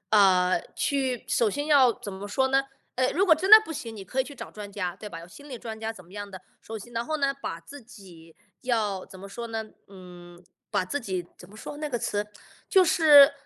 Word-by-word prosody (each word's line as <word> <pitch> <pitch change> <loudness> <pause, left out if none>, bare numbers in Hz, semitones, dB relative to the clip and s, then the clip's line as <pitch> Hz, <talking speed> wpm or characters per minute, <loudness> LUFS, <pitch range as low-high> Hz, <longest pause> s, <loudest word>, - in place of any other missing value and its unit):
啊， 185 -3 +4
去 265 -4 -1
首 230 - +2
先 290 +8 -3
要 270 -5 +6
怎 205 -3 -7
么 200 +2 -7
说 265 +5 +1
呢？ 270 +1 +2 0.3
呃， 255 0 +2
如 380 +5 +2
果 325 -5 +6
真 370 +5 -2
的 435 - +14
不 325 - -6
行， 230 -6 -7
你 195 - -8
可 260 +8 -1
以 260 - 0
去 285 - -10
找 - - -9
专 210 -1 -9
家， 185 -3 -3
对 210 - -9
吧？ 165 -4 -8
有 170 - -11
心 285 +11 -14
理 255 - -6
专 220 -1 -8
家 220 0 -3
怎 185 -6 -11
么 180 - -19
样 205 -1 -7
的， 185 -1 -10 0.2
首 220 0 -7
先 240 +4 -12
然 230 0 -1
后 310 - -1
呢， 275 -2 +1
把 165 - -4
自 285 +10 -12
己 180 -8 -15 0.2
要 215 -6 -1
怎 190 - -13
么 195 - -9
说 235 +4 -7
呢？ 225 -1 -4 0.2
嗯， 180 -2 -13 0.3
把 185 - +1
自 285 +10 -3
己 185 -5 -4
怎 180 - -13
么 210 - -15
说 290 +6 -8
那 300 - -3
个 245 -4 -2
词？ 205 -1 -2 0.4
就 380 -2 +5
是 300 -5 +7
220 Hz, 265 characters per minute, -26 LUFS, 190-275 Hz, 0.4 s, 的